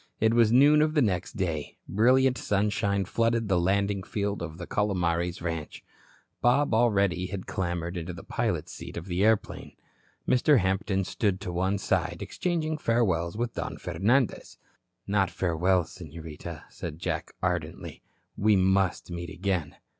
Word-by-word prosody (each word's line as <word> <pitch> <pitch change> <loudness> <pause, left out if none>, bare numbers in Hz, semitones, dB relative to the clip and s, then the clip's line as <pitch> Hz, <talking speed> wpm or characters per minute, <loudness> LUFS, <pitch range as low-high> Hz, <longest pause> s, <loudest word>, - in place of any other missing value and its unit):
It 110 +1 +3
was 115 -2 +4
noon 145 +5 +6
of 155 +1 +1
the 150 - +4
next 90 -5 -1
day. 80 -6 -3
Brilliant 125 +6 +4
sunshine 100 -2 0
flooded 115 +2 +1
the 90 -2 +3
landing 100 +2 +1
field 100 0 -3
of 80 -1 -6
the 85 - -6
Calomares 90 -4 0
ranch. 80 -3 -4 0.6
Bob 125 +2 +3
already 100 -6 +2
had 95 -1 -6
clambered 85 -1 -3
into 85 0 -4
the 85 -2 -9
pilot's - - -2
seat - - -8
of 85 - -5
the 90 +1 -1
airplane. 110 -1 +1 0.5
Mr. 130 +3 +4
Hampton 95 0 0
stood 95 0 -1
to 95 - -4
one 95 +3 0
side, 95 - -1
exchanging 160 -3 -2
farewells 95 - +1
with 120 0 -2
Don - - -4
Fernandez. 105 +9 0 0.5
"Not 100 -2 +1
farewell, 90 +1 +1
Senorita," 80 0 -9
said 75 - -7
Jack, - - -4
ardently. - - -3 0.3
"We 105 +1 +3
must 95 -1 +1
meet 85 0 -5
again." 90 -5 -2
95 Hz, 145 wpm, -27 LUFS, 85-110 Hz, 0.6 s, noon